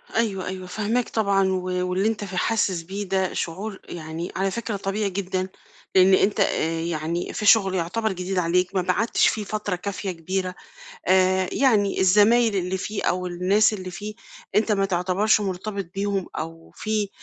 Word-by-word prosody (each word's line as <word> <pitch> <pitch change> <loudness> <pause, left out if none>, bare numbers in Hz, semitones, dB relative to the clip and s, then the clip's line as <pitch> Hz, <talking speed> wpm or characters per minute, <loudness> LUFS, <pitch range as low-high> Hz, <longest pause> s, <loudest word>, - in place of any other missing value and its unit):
أيوه، 210 -5 0
أيوه 185 0 -5
فاهماك 220 +6 -1
طبعًا 200 -3 +2
و 185 -1 0 0.3
واللي 190 +3 +1
أنت 220 -2 -1
في 190 -2 -6
حاسس 195 -4 +1
بيه 195 +5 -5
ده 190 -1 0
شعور 190 +4 -4
يعني 165 +1 -5
على 195 +1 0
فكرة 230 +1 -3
طبيعي 200 +1 -1
جدًا، 185 -1 -2 0.5
لأن 190 0 +6
أنت 200 +3 +3
آآ، 165 -4 +1
يعني 165 +1 -2
في 210 - -3
شغل 200 -3 +5
يعتبر 200 +6 -1
جديد 185 +1 -3
عليك، 180 +2 +1
ما 185 - +3
قعدتش 185 +6 +2
فيه 215 - 0
فترة 210 -2 -2
كافية 195 +1 -4
كبيرة، 185 +2 -3 0.5
آآ، 185 0 +3
يعني 215 -7 +2
الزمايل 210 +4 +5
اللي 185 0 -1
فيه 205 +3 -4
أو 180 +1 0
الناس 185 +5 +3
اللي 185 -3 -5
فيه، 210 +3 -7 0.4
أنت 215 +1 +3
ما 195 -1 +2
تعتبرش 190 +3 +2
مُرتبِط 200 +1 -3
بيهم 200 -1 -1
أو 165 +1 -7
في 215 -1 -1
190 Hz, 165 wpm, -24 LUFS, 180-210 Hz, 0.5 s, لأن